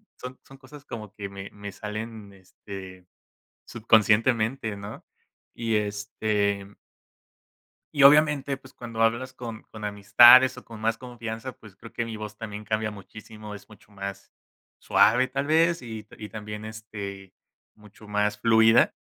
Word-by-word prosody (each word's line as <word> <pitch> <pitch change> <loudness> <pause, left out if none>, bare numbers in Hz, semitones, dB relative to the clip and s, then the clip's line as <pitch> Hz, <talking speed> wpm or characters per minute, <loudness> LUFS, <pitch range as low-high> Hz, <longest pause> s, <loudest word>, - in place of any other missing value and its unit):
son 125 0 -9
son 135 - -15
cosas 140 +1 -14
como 105 -4 -8
que 100 -2 -6
me 100 0 -9
me 100 -1 -9
salen, 105 -1 -7
este, 95 -1 -11 0.6
subconscientemente, 110 0 +2
¿no? 100 +1 -9 0.5
Y, 115 -2 -2
este 105 -1 -1 1.2
y 145 -1 +4
obviamente, 145 -1 +5
pues, 130 -1 -17
cuando 115 -2 -4
hablas 120 +3 +1
con 115 -3 -8
con 110 -1 -10
amistades, 120 +5 +7
o - - -11
con 110 -2 -11
más 115 +1 0
confianza, 120 0 -7
pues, 105 -4 -17
creo 115 - -13
que 115 - -3
mi 110 -1 -6
voz 105 0 -8
también 105 -2 -7
cambia 110 0 -1
muchísimo, 105 +1 -11
es 100 - -12
mucho 105 0 -18
más 100 0 -7 0.5
suave 125 +4 +4
tal 135 +2 -2
vez, 165 0 +3
y 110 -3 -8
y 105 - -9
también, 105 -1 -7
este, 100 -3 -8 0.4
mucho 105 0 -17
más 105 0 0
fluida, 115 +1 +5
110 Hz, 145 wpm, -26 LUFS, 105-120 Hz, 1.2 s, amistades